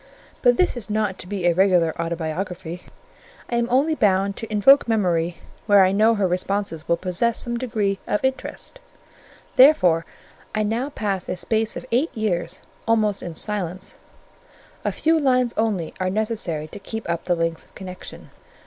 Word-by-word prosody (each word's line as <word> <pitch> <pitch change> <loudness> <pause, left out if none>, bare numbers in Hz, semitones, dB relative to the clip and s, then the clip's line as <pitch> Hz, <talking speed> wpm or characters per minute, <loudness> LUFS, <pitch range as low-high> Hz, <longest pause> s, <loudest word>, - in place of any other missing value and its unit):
But 245 -1 +4
this 365 - +2
is 225 -5 -7
not 210 -2 -1
to - - -7
be 195 -2 -3
a 175 - +4
regular 180 -3 +3
autobiography: 170 +1 -4 0.7
I 235 - +1
am 235 0 +1
only 275 +6 +3
bound 195 -6 +2
to 225 - -7
invoke 255 +7 +6
Memory 175 -6 +1 0.3
where 200 -2 +7
I 185 - +2
know 215 +3 +4
her 200 -3 +1
responses 180 -2 -2
will 170 - +2
possess 185 +6 0
some 240 0 -3
degree 215 -5 -1
of 210 - 0
interest; 265 - -4 0.8
therefore 185 - +6 0.5
I 215 - +1
now 230 +6 -1
pass 200 -8 -3
a - - -1
space 220 +3 -1
of - - -7
eight 265 +8 +2
years 200 -6 -2 0.3
almost 215 -3 +2
in 170 -2 -6
silence: 190 -1 -4 0.9
a - - 0
few 320 0 +2
lines 255 -4 +2
only 205 -7 -1
are 185 0 0
necessary 200 -7 -2
to - - -9
keep 220 +3 -6
up 170 -1 -2
the 175 - +2
links 165 -1 -2
of - - -28
connection. 185 -1 -9
200 Hz, 165 wpm, -23 LUFS, 180-230 Hz, 0.9 s, where